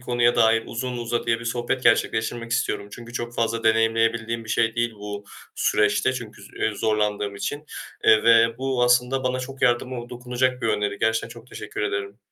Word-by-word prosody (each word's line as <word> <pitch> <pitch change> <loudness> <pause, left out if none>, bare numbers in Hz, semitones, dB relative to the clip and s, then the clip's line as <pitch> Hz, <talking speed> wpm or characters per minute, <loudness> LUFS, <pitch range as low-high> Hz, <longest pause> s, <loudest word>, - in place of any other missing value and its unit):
konuya 120 -1 +2
dair 115 -1 +4
uzun 125 +1 -4
uzadıya 115 0 -1
bir 115 - -8
sohbet 120 +2 -2
gerçekleştirmek 115 +1 +1
istiyorum, 105 -4 -1
çünkü 120 0 -10
çok 120 0 -4
fazla 115 0 -1
deneyimleyebildiğim 115 0 +2
bir - - -13
şey 115 0 +1
değil 120 -1 0
bu 105 0 -7 0.3
süreçte 105 +4 +2
çünkü, 110 -5 -8 0.2
eee, 110 - +1
zorlandığım 105 -2 0
için, 145 +8 -4 0.4
eee, 110 - +6
ve 115 0 +5
bu 130 -1 0
aslında 125 +2 +3
bana 130 0 0
çok 135 +1 -8
yardımı 120 0 +1
dokunacak 125 +1 -1
bir - - +1
öneri. 105 -1 -1
Gerçekten 110 +1 0
çok 115 0 -12
teşekkür 110 -4 -7
ederim. 100 0 -3
115 Hz, 170 wpm, -24 LUFS, 110-125 Hz, 0.4 s, eee